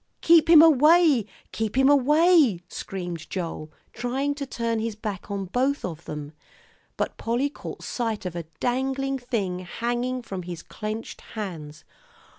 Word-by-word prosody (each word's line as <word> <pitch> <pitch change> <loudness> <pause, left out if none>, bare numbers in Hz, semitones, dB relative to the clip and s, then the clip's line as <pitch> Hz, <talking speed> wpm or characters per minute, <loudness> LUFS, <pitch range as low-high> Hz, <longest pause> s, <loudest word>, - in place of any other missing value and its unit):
"Keep 330 -1 +5
him 325 -2 +9
away, 305 - +5 0.2
keep 220 +2 -3
him 265 0 +5
away," 290 - +5
screamed 175 -4 -6
Joel, 165 -4 -5 0.2
trying 260 +5 -1
to 285 -1 -6
turn 230 -2 -2
his 225 -1 -3
back 210 -3 -6
on 200 -1 -3
both 260 +9 0
of 170 -2 -7
them. 150 -1 -6 0.7
But - - -2
Polly 245 +5 -1
caught - - -9
sight 225 -4 -3
of 180 -2 -4
a 170 -2 -4
dangling 265 +2 -1
thing 205 -8 -2
hanging 240 +7 -3
from 190 -5 -5
his 175 -1 -7
clenched 215 +1 -6 0.2
hands. 165 -7 -6
230 Hz, 145 wpm, -25 LUFS, 185-270 Hz, 0.7 s, him